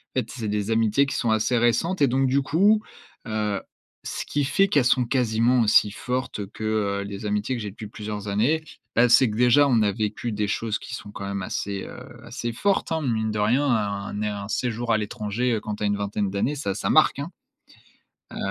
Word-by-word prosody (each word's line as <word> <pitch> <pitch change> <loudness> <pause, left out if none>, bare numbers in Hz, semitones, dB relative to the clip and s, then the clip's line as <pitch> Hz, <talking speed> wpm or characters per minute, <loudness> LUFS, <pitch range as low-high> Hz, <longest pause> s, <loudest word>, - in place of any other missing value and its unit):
En - - +3
fait, 115 - -4
c'est 115 -4 -5
des 105 +1 -1
amitiés 115 +4 +3
qui 135 - -4
sont 115 - 0
assez 110 +3 +2
récentes 120 - +1
et 140 - +6
donc 135 +2 +2
du 135 +2 +2
coup, 200 +10 +3 0.4
heu, 105 -2 -1 0.4
ce - - -4
qui 145 - -1
fait 195 +8 +3
qu'elles 145 -8 +3
sont 125 0 +3
quasiment 120 0 +2
aussi 105 -1 +5
fortes, 125 -2 -3
que, 110 - -8 0.4
heu, - - -3
les 100 +1 -7
amitiés 105 +5 -1
que 120 - -4
j'ai 105 -2 -5
depuis 105 +1 -9
plusieurs 105 -1 -6
années, 115 +11 +1 0.3
bah, 120 +2 +5
c'est 125 +1 +5
que, 105 - -4
déjà, 125 +4 +5
on 120 -4 +3
a 105 - +2
vécu 110 +2 -3
des 105 0 -1
choses 110 0 -1
qui 130 - -7
sont 105 - -9
quand 100 - -7
même 100 0 -3
assez, 100 +1 -3
heu, - - -9 0.3
assez 120 - -4
fortes, 195 - 0
hein, 160 0 0
mine 110 -5 0
de 105 - -3
rien, 120 +8 +2
un 105 -6 -1
né 105 +1 -1
un 100 0 -5
séjour 120 0 -1
à 110 - +4
l'étranger, 110 +3 -2
heu, 110 - 0
quand 105 -1 -4
tu 105 - -6
as - - +2
une 100 0 +1
vingtaine 100 0 -2
d'années, 100 +9 -1
ça 100 -10 -3
ça - - -2
marque, 155 -2 +4
hein, 145 +5 -5 1.0
heu - - -7
115 Hz, 225 wpm, -24 LUFS, 105-130 Hz, 1.0 s, et